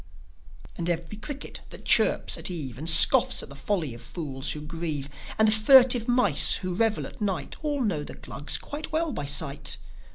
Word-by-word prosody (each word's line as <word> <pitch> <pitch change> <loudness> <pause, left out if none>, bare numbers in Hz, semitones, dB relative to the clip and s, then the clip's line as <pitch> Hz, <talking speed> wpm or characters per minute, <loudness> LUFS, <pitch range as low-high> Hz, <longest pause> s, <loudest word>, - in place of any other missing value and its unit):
And 170 0 -3
every 170 +3 -3
cricket 280 +6 -7
that - - -11
chirps - - +3
at - - -2
eve, 140 -8 -6
And 160 +3 -3
scoffs 160 -1 +5
at - - -11
the 140 - -11
folly 155 - -2
of 115 - -12
fools 140 -4 -4
who 150 - -8
grieve, 155 -2 -5 0.3
And 220 - +4
the - - +4
furtive 245 +1 +6
mice 240 - +3
who 185 -1 -4
revel 220 +3 0
at - - -12
night, 195 -4 -3
All 290 -3 -1
know 185 -10 -1
the - - -8
Glugs 145 - -2
quite 305 +2 -8
well 320 -1 -1
by 145 - -4
sight. 140 0 0
175 Hz, 190 wpm, -26 LUFS, 150-230 Hz, 0.3 s, furtive